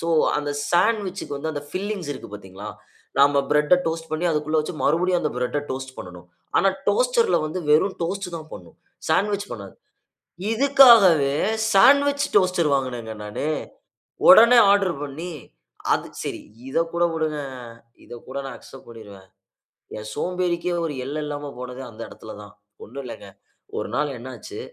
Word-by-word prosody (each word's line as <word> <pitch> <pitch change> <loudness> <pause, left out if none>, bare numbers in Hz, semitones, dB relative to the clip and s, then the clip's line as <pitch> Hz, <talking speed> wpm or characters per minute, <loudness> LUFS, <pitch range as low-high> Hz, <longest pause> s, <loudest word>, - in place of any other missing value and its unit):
So 165 - -4 0.3
அந்த 145 -1 -2 0.2
சாண்ட்விச்‌க்கு 195 -4 0
வந்து 160 +3 -3
அந்த 145 -1 -5
பில்லிங்ஸ் 195 -4 -4
இருக்கு - - -9
பாத்தீங்களா? 100 0 -10 0.5
நாம 140 0 +5
பிரெட்ட 150 +3 +4
டோஸ்ட் 165 0 -3
பண்ணி, 155 +3 -2
அதுக்குள்ள 155 0 0
வச்சு 155 +3 -5
மறுபடியும் 175 +3 +2
அந்த 150 - 0
பிரெட்‌ட 125 +4 -1
டோஸ்ட்டு 130 0 -6
பண்ணணும். 90 -1 -10 0.3
ஆனா, 195 - +4 0.2
டோஸ்டர்‌ல்ல 230 -3 +2
வந்து 180 +4 -4
வெறும் 160 +6 +3
டோஸ்ட் 190 +2 -3
தான் 160 0 -10
பண்ணும். - - -11 0.3
சாண்ட்விச் 200 +4 +1
பண்ணாது. 100 -4 -9 0.8
இதுக்காகவே 225 - +6 0.4
சாண்ட்விச் 280 +7 +5
டோஸ்டர் 180 -4 +3
வாங்குனேங்க 120 -4 -3
நானு. 105 +8 -4 0.8
ஒடனே 240 -2 +9
ஆர்டர் 200 -3 +3
பண்ணி. 160 +6 -6 0.6
அது - - 0 0.2
சரி - - -5 0.3
இத 135 - -1
கூட 170 0 +1
விடுங்க. 155 -2 -2 0.7
இத - - -14 0.2
கூட 135 - -8
நான் 135 - -7
அக்செப்ட் 135 - -14
பண்ணிருவேன். 100 -5 -13 0.7
என் 110 0 -7
சோம்பேறிக்கே 180 -1 -1
ஒரு 155 - -3
எல்ல 150 +3 -4
இல்லாம 145 -1 -5
போனது 125 +1 -7
அந்த 110 - -14
எடத்துல - - -11
தான். 100 - -13 0.3
ஒண்ணும் 140 - -8
இல்லங்க, 105 -4 -9 0.5
ஒரு - - -4
நாள் 145 -3 -1
என்னாச்சு 120 -1 -9
155 Hz, 145 wpm, -23 LUFS, 135-185 Hz, 0.8 s, ஒடனே